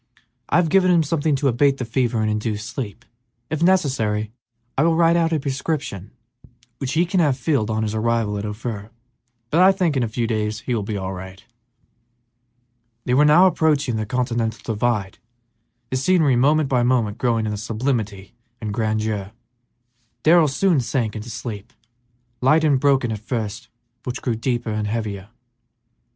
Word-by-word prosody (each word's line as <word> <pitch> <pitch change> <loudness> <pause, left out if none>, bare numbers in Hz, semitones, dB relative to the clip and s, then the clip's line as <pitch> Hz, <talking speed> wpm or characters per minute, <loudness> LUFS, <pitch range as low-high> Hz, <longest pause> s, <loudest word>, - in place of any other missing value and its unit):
I - - +1
have 170 -2 +3
given 185 +1 +4
him 170 -2 +4
something 150 -1 0
to 140 +1 0
abate 135 +2 +3
the 125 - -4
fever 120 -1 0
and 110 - 0
induce 105 0 -2
sleep. 115 -2 -6 0.5
If 155 0 -2
necessary, 130 - +1 0.4
I - - +1
will 165 +1 +3
write 165 0 +4
out 165 -1 +2
a 160 - +1
prescription 135 - -3 0.7
which 135 -2 -3
he 165 +2 +3
can 180 +2 0
have 145 -6 +2
filled 135 -5 0
on 110 0 0
his 105 -1 -2
arrival 110 -1 0
at - - -5
Ophir, 105 0 -5 0.6
but 165 - +4
I 190 +1 +7
think 180 -6 0
in 130 - +1
a 120 - 0
few 115 +2 -2
days 110 -1 -2
he 125 - -3
will 115 - 0
be 105 +1 -4
all 95 0 -4
right." 95 +1 -10 1.6
They 125 - 0
were 145 +4 +5
now 160 +5 +6
approaching 150 -8 +2
the 110 -1 -3
continental 115 -2 -2
divide, 105 -4 -1 0.7
the 130 - 0
scenery 150 -1 +3
moment 145 +4 +3
by 125 -2 +1
moment 120 -4 +1
growing 115 -3 +1
in 105 -1 -2
sublimity 110 -2 -3 0.3
and 105 -3 -4
grandeur. 110 -2 -2 0.9
Darrell 165 0 +6
soon 165 +3 +2
sank 120 -3 -1
into 105 +2 -6
a - - -7
sleep, 115 -2 -7 0.7
light 150 +5 +4
and 145 -4 +3
broken 135 -4 +2
at 110 - -4
first, 110 -1 -4 0.3
but 125 - -4
which - - -8
grew 120 - 0
deeper 120 0 -2
and 105 0 -2
heavier. 105 -3 -4
120 Hz, 175 wpm, -22 LUFS, 110-145 Hz, 1.6 s, I